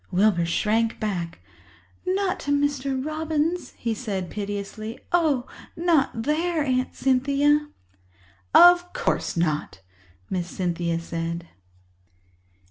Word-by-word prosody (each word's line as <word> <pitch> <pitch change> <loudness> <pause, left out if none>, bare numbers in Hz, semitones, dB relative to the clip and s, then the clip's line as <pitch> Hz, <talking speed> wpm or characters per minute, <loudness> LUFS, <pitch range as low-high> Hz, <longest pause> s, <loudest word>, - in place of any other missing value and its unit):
Wilbur 185 -2 +3
shrank 220 +6 +1
back. 180 -6 -3 0.7
"Not 380 0 0
to 285 - -3
Mr. 280 -2 0
Robins," 315 +2 -1
he 230 -1 -1
said 200 -6 -4
piteously. 205 +2 -5
"Oh, 310 -8 +2 0.3
not 315 -9 +1
there, 315 +3 +1
Aunt 255 -2 0
Cynthia!" 280 +3 +2 0.8
"Of 350 0 +7
course - - -1
not," 155 - -1 0.5
Miss 180 -2 -2
Cynthia 170 -2 -1
said. 170 0 -4
255 Hz, 100 wpm, -25 LUFS, 185-300 Hz, 0.8 s, Of